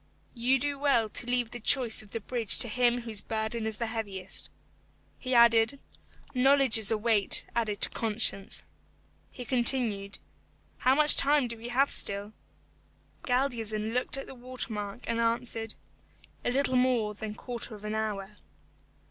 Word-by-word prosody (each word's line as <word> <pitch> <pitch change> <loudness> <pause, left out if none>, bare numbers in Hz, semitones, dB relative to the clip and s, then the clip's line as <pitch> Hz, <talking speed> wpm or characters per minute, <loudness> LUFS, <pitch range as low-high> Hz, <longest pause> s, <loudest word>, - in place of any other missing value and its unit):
You 250 +2 +1
do 280 +1 -4
well 255 -6 +1
to 240 - -4
leave 245 -2 -1
the 245 - -8
choice 240 0 +3
of 210 - -16
the 230 - -5
bridge 230 0 +1
to 245 - +4
him 245 +1 0
whose 220 -3 -2
burden 220 0 -4
is 220 -1 -4
the 235 - -3
heaviest." 200 -4 -4 0.7
He 255 -1 -3
added, 235 +2 +4 0.5
"Knowledge 270 -2 +4
is 215 - +5
a 220 - +2
weight 215 -2 +3
added 215 -3 -2
to - - +4
conscience." 215 -2 -1 0.7
He 250 - -10
continued, 235 -5 +1 0.6
"How 260 +1 +2
much 300 +1 +7
time 285 -2 +3
have 230 - -9 0.3
we - - -8
still?" 200 +1 +2 0.9
Galdeazun 225 -4 -2
looked 250 +3 -1
at 270 - -6
the - - -11
water 250 -2 -1
mark, 205 +2 -6
and 230 0 -3
answered, 230 -1 -2 0.7
"A - - -1
little 260 +1 0
more 245 -4 0
than 210 0 -7
a - - -15
quarter 235 -2 -5
of 210 0 -13
an 210 - -4
hour." 210 -2 -4
230 Hz, 160 wpm, -28 LUFS, 215-250 Hz, 0.9 s, much